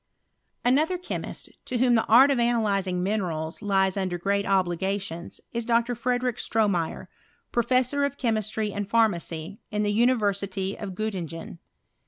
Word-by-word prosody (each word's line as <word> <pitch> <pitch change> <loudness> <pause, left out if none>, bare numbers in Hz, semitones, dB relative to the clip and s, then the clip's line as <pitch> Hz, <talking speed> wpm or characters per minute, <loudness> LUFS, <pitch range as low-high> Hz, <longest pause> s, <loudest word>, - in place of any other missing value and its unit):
Another 305 +8 +3
chemist, 360 - -6 0.2
to 250 - -2
whom 245 0 +4
the 225 -1 +3
art 260 +5 +7
of 265 - +1
analyzing 200 -6 +1
minerals 175 -6 -2
lies 195 -2 +2
under 185 -3 -1
great 200 +3 0
obligations, 190 -1 -1
is 235 0 -2
Dr. 235 +1 +2
Frederick 245 0 -1
Stroraeyer, 200 -7 0 0.5
professor 255 +4 +2
of 280 0 -1
chemistry 215 -3 -1
and 205 -1 -4
pharmacy, 195 -5 0
ia 210 - -2
the 205 0 +1
University 200 -5 +1
of 195 -3 -6
Gottingen. 175 -6 -5
210 Hz, 135 wpm, -26 LUFS, 190-235 Hz, 0.5 s, art